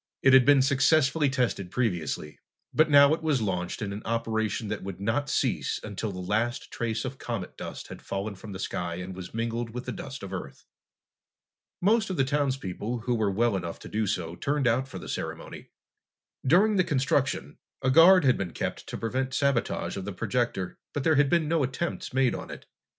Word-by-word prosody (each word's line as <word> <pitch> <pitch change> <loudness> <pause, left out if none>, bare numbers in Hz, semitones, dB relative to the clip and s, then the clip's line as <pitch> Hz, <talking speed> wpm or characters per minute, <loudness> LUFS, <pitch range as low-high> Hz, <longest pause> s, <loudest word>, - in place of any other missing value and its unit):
It 135 - +6
had 130 -2 +8
been 140 -1 +6
successfully 140 +2 +3
tested 120 -8 -1
previously, 90 - -2 0.3
but 155 0 +4
now 140 0 +7
it 165 - -2
was 155 -4 +1
launched 90 -3 -2
in 100 -1 -3
an 105 - -6
operation 110 -1 -1
that 105 - -3
would 95 -1 -7
not 115 +8 -1
cease - - 0
until 105 0 -4
the 90 - -8
last 110 +7 -1
trace 115 -1 -2
of 130 +1 -6
comet 110 -7 -5
dust - - -7
had - - -9
fallen 100 +2 -4
from 100 +2 -10
the 95 - -6
sky 90 -2 -3
and 90 +1 -6
was 95 +3 -8
mingled 115 +1 -2
with 125 - -5
the - - -3
dust 135 -3 -7
of 100 - -7
the 95 - -2
Earth. - - -14 1.2
Most 210 +3 +3
of 185 - -3
the 135 - +4
townspeople 130 -5 -2
who 125 +2 0
were 110 -3 +1
well 110 +2 +1
enough 85 -3 -4
to - - -9
do 110 0 -1
so 85 -2 -2
turned 140 +4 -1
out 125 +3 +2
for 130 - -8
the - - -8
ceremony. - - -6 0.7
During 195 +9 +4
the 185 - +5
construction, 135 - 0 0.2
a 130 - +3
guard 165 +3 +7
had 130 - +4
been 90 -4 -3
kept - - -4
to - - -5
prevent 130 +3 -2
sabotage 140 -7 0
of 95 - -5
the 100 - -4
projector, 105 -2 -2
but 145 - -2
there 160 -1 +3
had 140 -1 +4
been 165 -1 +2
no 165 0 +2
attempts 135 +6 -3
made 130 -1 +2
on - - -6
it. - - -9
120 Hz, 205 wpm, -27 LUFS, 100-140 Hz, 1.2 s, had